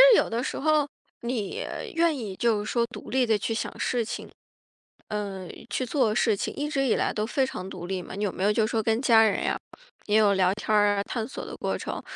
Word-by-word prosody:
有 - - +4
的 235 +2 -1
时 - - -3
候， 305 0 +3 0.3
你， 235 -5 -2 0.3
愿 330 -2 +2
意 210 -6 -5
就 215 -2 +1
是 - - -3
说 235 -1 +2
独 250 - -10
立 260 0 +3
地 220 -2 +3
去 225 - -2
想 225 - -2
事 245 -2 +1
情 220 - -5 0.8
呃， 200 -3 -4 0.2
去 255 - -1
做 235 -4 +1
事 220 -1 +3
情， - - -3
一 290 - -2
直 275 -2 +1
以 230 - +3
来 - - +1
都 215 0 -1
非 265 +3 +1
常 190 -6 -6
独 175 -2 -7
立 190 0 -2
嘛。 - - -9
你 205 +2 -2
有 195 - 0
没 - - -5
有 205 - +4
就 215 +1 +2
说 220 0 0
跟 225 +1 +2
家 230 -4 +6
人 215 -2 +2
呀， - - 0 0.5
也 210 - +3
有 210 -2 +5
聊 185 -1 +3
天 215 +1 -1
儿 205 -1 +4
啊， 200 - +1
探 225 +2 -3
索 - - -6
的 - - -7
过 - - -1
程？ - - -5
220 Hz, 260 characters per minute, -27 LUFS, 205-245 Hz, 0.8 s, 家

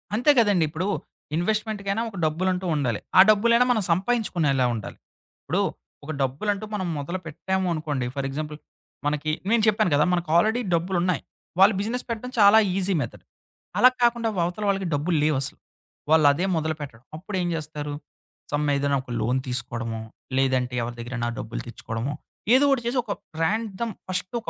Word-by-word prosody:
అంతే 250 +7 +5
కదండీ 205 -7 +4
ఇప్పుడు 165 +5 -3 0.5
ఇన్వెస్ట్‌మెంట్‌కైనా 210 +2 -1
ఒక 200 - -10
డబ్బులంటూ 180 +4 0
ఉండాలి. 125 -8 0 0.2
ఆ - - +11
డబ్బులైనా 235 +3 +5
మనం 220 -4 +2
సంపాయించుకునేలా 170 - +1
ఉండాలి. 110 -3 -6 0.5
ఇప్పుడు - - 0 0.4
ఒక 150 - -5
డబ్బులంటూ 195 +11 -1
మనం 190 -3 -2
మొదలుపెట్టామూ 180 +4 -3
అనుకోండి. 150 -5 -2
ఫర్ 140 -1 -2
ఎగ్జాంపుల్ 150 +2 -5 0.5
మనకి 150 +1 0 0.2
నేను 230 -1 +3
చెప్పాను 215 -2 +3
కదా! 150 - +4
మనకు 175 -2 -1
ఆల్రెడీ 220 +7 +3
డబ్బులున్నాయి. 175 +1 +1 0.4
వాళ్ళు 195 +3 +7
బిజినెస్ 230 +5 -2
పెట్టడం 235 +2 -4
చాలా 205 +1 +8 0.2
ఈజీ 195 0 +1
మెథడ్. 120 - -6 0.5
అలా 255 - +8
కాకుండా 235 -1 +3
వ - - -1
అవతల 180 +5 -4
వాళ్ళకి 195 -2 0
డబ్బులు 155 +4 +1
లేవసలు. 150 0 0 0.5
వాళ్ళదే 155 +2 +5
మొదలుపెట్టాడం. 150 -7 -4
అప్పుడేం 185 +1 -3
చేస్తారు? 150 -2 -5 0.6
సమ్ 150 0 0
ఏదైన 140 0 +1
ఒక 125 - -10
లోన్ 120 +4 +1
తీసుకోడమో, 115 -2 -3 0.4
లేదంటే 130 -2 +1
ఎవరి 120 +1 -4
దగ్గరైనా 120 0 -3
డబ్బులు 110 -2 -5
తెచ్చుకోడమో, 115 +3 -4 0.4
ఏదో 275 +2 +5
ఒకటి 270 -3 +2
చేసి 245 +2 -1
ఒక 210 - -6 0.3
ర్యాండమ్ 220 +4 -1 0.2
ఫస్టొక 200 +5 -3
175 Hz, 145 wpm, -25 LUFS, 145-210 Hz, 0.6 s, ఆ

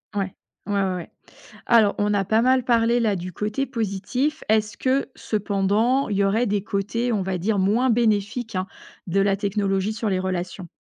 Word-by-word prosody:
Ouais. 195 -2 -2 0.3
Ouais, 205 - -3
ouais, 190 -1 0
ouais. 175 - -7 0.5
Alors, 220 -4 +5
on 205 0 +1
a 200 -1 +2
pas 220 +4 +2
mal 255 +1 +3
parlé, 235 0 +3
là, 215 -3 +2
du 180 +1 -6
côté 215 +9 -2
positif. 235 +7 -2
Est-ce 215 -1 +1
que, 270 +2 0
cependant, 210 +5 +1
il 205 - -2
y 200 - +3
aurait 215 +5 +2
des 200 -1 0
côtés, 220 +4 -1
on 210 -4 0
va 190 0 -2
dire, 200 +4 0
moins 220 +7 +2
bénéfiques, 225 0 0
hein, 185 0 -1 0.4
de 185 +3 +1
la 195 0 +3
technologie 200 0 -1
sur 220 0 -2
les 190 -2 0
relations? 185 -1 -4
205 Hz, 190 wpm, -23 LUFS, 195-230 Hz, 0.5 s, Alors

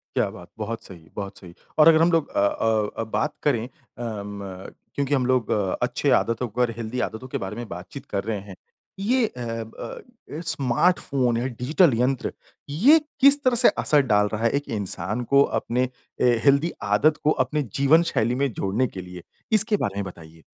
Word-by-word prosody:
क्या - - +1
बात! - - -12
बहुत 115 0 -5
सही, 85 -4 -13
बहुत 100 -1 -6
सही। 90 -3 -12 0.3
और 155 - +8
अगर 160 -1 +7
हम 170 +2 +4
लोग 165 -3 +1
अ - - -2
अ 110 0 +1
अ, - - -1
बात 145 +7 -2
करें 120 -6 +1
अ 115 -5 -8
म 100 -2 -8 0.2
क्योंकि 140 0 -1
हम 130 -3 +2
लोग 125 -3 +1 0.3
अच्छे - - 0
आदतों 115 +2 -2
पर, 120 +2 0
हेल्थी 120 +2 -4
आदतों 110 +4 -4
के - - -3
बारे 95 +2 -5
में 120 -1 -6
बातचीत 90 +10 -8
कर 100 -1 -2
रहे 110 -1 -3
हैं। 95 - -9 0.4
ये 240 +4 +2
अ - - -12
अ, 115 -1 -6 0.5
स्मार्ट 135 +7 +2
फ़ोन 125 -4 0
या 120 - -1
डिजिटल 135 +5 +2
यंत्र, 130 +1 0 0.4
ये 255 - +5 0.2
किस 280 +1 +6
तरह 255 -2 +3
से - - +8
असर 150 -1 +4
डाल 105 0 +4
रहा 110 +2 -2
है 115 - +4
एक 145 - -17
इंसान 100 +4 -3
को 140 - +6 0.2
अपने 125 +2 -1 0.3
ए, 120 -1 +4
हेल्थी 140 +4 +4
आदत 135 +10 +3
को 155 - +4
अपने 150 -1 -2 0.2
जीवन 155 +5 +5
शैली 120 -1 +1
में 140 0 0
जोड़ने 105 +7 0
के 95 - -8
लिए। 90 -1 -10 0.3
इसके 215 0 +3
बारे 100 -1 -4
में 100 - -2
बताइए? 80 -3 -12
120 Hz, 195 wpm, -24 LUFS, 105-145 Hz, 0.5 s, और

